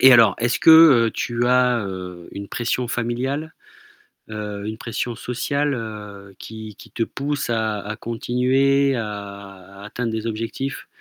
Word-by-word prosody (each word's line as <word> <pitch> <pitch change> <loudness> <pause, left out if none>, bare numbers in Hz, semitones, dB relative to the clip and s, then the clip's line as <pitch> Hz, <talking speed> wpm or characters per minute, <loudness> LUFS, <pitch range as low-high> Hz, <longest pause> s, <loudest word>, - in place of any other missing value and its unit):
Et 130 0 +9
alors, 115 -5 +7
est-ce 120 +2 +1
que, 160 - +6 0.4
heu, - - -4
tu 120 0 -1
as, 125 -1 +3
heu, 90 -2 -7
une 100 0 -7
pression 120 0 -2
familiale? 130 +7 -2 0.8
Heu, 105 -1 -5
une 110 +1 -4
pression 115 +1 -4
sociale, 140 +5 -1
heu, 105 -4 -8
qui 110 -2 -9
qui - - -14
te 115 - -3
pousse 140 +4 -2
à 110 -3 0
à 105 +1 -6
continuer, 130 +4 +1
à 100 -3 -7
à - - -10
atteindre 115 +2 -3
des 110 0 -3
objectifs, 115 +5 -4
115 Hz, 155 wpm, -22 LUFS, 105-125 Hz, 0.8 s, Et